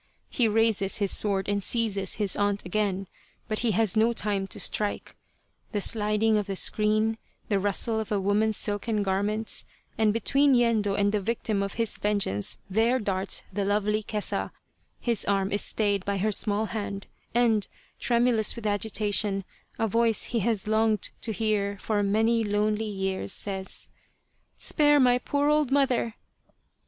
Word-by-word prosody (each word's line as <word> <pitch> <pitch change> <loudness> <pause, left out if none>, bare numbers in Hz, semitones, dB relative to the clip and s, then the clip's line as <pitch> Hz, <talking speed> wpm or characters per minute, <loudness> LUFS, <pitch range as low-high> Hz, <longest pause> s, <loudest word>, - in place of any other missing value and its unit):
He 240 -4 +2
raises 220 -3 +1
his 200 -3 +1
sword 195 -2 0
and 200 -1 -1
seizes 200 -4 -1
his 205 -3 0
aunt 205 0 0
again, 195 0 -1 0.4
but 215 -1 -1
he 240 - +1
has 220 0 +2
no 225 +2 +3
time 205 -3 -1
to - - -3
strike: 210 -1 -1 0.6
the 210 - 0
sliding 215 +1 +2
of 205 -1 -2
a 195 - -2
screen, 215 +3 +2 0.3
the 200 -2 +2
rustle 205 +3 0
of 220 - -5
a 205 - +1
woman's 210 +2 +1
silken 210 +1 -2
garments, 205 +3 -1 0.4
and 215 -1 +4
between 275 +5 +3
Yendo 225 -4 +2
and 200 0 +2
the 210 -1 0
victim 215 -1 -1
of 200 0 -4
his 230 -1 -2
vengeance 200 - 0
there 225 +6 +2
darts 195 -4 -1
the 200 +1 -1
lovely 210 +1 0
Kesa 210 -1 -2 0.5
his 235 -4 -1
arm 195 -1 0
is 205 - 0
stayed 205 -3 0
by 200 0 -2
her 215 +3 0
small 210 +1 +1
hand, 200 -3 -5 0.3
and, 225 -4 +2 0.3
tremulous 235 -2 +2
with 235 -2 -8
agitation, 205 -1 +1 0.3
a 225 - 0
voice 230 0 +1
he 235 - -2
has 220 -1 -1
longed 220 -1 +1
to 225 - -1
hear 205 -1 -1
for 210 -2 -1
many 225 +3 +2
lonely 210 +1 0
years 190 - -2
says: 190 -2 -2 0.4
" - - -44
Spare 295 -1 +4
my 250 -2 +4
poor 285 +3 -1
old 300 -2 +2
mother 265 -5 +1
210 Hz, 160 wpm, -26 LUFS, 200-225 Hz, 0.6 s, and